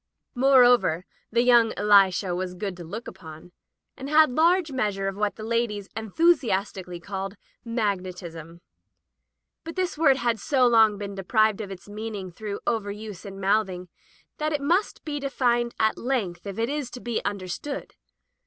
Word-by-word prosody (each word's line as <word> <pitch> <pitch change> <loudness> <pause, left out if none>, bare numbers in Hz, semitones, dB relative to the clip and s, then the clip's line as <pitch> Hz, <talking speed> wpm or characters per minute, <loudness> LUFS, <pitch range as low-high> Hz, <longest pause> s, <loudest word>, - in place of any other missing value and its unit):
Moreover, 245 -9 +4 0.3
the 235 0 +3
young 240 -2 +5
Elisha 195 -3 +4
was 180 0 -4
good 195 0 -4
to 175 - -8
look 210 +8 -7
upon, 160 0 -11 0.4
and 270 +1 -7
had 310 -2 +5
large 335 +2 +3
meas 215 -7 -1
ure 195 0 -2
of 195 - -3
what 210 0 -1
the 215 - -9
ladies 220 -3 -1
enthusiastically 210 - 0
called 195 +2 -5 0.2
" - - -58
magnetism.*' 180 -7 -4 1.0
But 330 0 -7
this 370 -4 -2
word 275 -5 +5
has 235 -4 0
so 260 +1 +2
long 225 -3 +5
been 200 0 -6
deprived 215 +2 +1
of 205 - -6
its 190 -1 -10
meaning 205 -3 -6
through 205 +3 -6
over 220 -4 -1
use 210 -2 -8
and 195 -1 -8
mouthing 190 -2 0 0.5
that 305 0 0
it 290 - -1
must 350 +8 0
be 295 -2 -3
defined 240 -4 0
at 220 0 +2
length 205 -8 -2
if 195 - -6
it 230 +1 0
is 290 -3 -3
to 250 - -9
be 240 -2 -3
understood. 205 +8 -5
215 Hz, 165 wpm, -25 LUFS, 195-250 Hz, 1.0 s, young